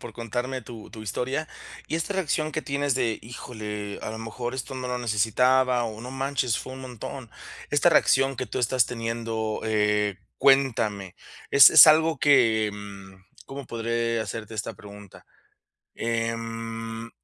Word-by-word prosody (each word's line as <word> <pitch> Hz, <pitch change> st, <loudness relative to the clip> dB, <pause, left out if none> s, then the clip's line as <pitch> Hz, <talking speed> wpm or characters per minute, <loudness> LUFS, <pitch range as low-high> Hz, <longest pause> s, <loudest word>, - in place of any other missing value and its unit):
por 120 Hz, -, -9 dB
contarme 120 Hz, +2 st, -4 dB
tu 115 Hz, -1 st, -11 dB
tu 110 Hz, -2 st, -10 dB
historia, 130 Hz, +8 st, -3 dB, 0.4 s
Y 160 Hz, -, -2 dB
esta 180 Hz, +5 st, -3 dB
reacción 155 Hz, -4 st, -1 dB
que 155 Hz, -, -3 dB
tienes 140 Hz, -1 st, -1 dB
de: 120 Hz, -4 st, 0 dB
"Híjole, 105 Hz, -3 st, -7 dB
a -, -, -5 dB
lo 110 Hz, -, -6 dB
mejor 120 Hz, +2 st, -5 dB
esto 130 Hz, +1 st, -5 dB
no 130 Hz, -1 st, -5 dB
lo 125 Hz, -, -2 dB
necesitaba, 125 Hz, +3 st, +2 dB
o 110 Hz, -1 st, -6 dB
no 125 Hz, +2 st, -8 dB
manches, 135 Hz, -3 st, -1 dB
fue 130 Hz, -, -8 dB
un 130 Hz, -, -9 dB
montón". 125 Hz, -1 st, -8 dB, 0.4 s
Esta -, -, +4 dB
reacción 135 Hz, 0 st, +3 dB
que 130 Hz, 0 st, -3 dB
tú -, -, -4 dB
estás 125 Hz, -1 st, +2 dB
teniendo, 115 Hz, -2 st, -3 dB
eh, 105 Hz, -2 st, +1 dB, 0.2 s
cuéntame, 115 Hz, -9 st, +2 dB, 0.4 s
es 140 Hz, -1 st, +9 dB
es -, -, +10 dB
algo 160 Hz, -1 st, +4 dB
que, 115 Hz, -7 st, +4 dB
mm, 100 Hz, -2 st, -10 dB, 0.3 s
¿cómo 135 Hz, -1 st, -8 dB
podré 115 Hz, 0 st, -1 dB
hacerte 110 Hz, 0 st, -6 dB
esta 110 Hz, +2 st, -4 dB
pregunta? 105 Hz, -2 st, -14 dB, 0.7 s
Em, 115 Hz, 0 st, -4 dB
115 Hz, 155 wpm, -25 LUFS, 110-130 Hz, 0.7 s, es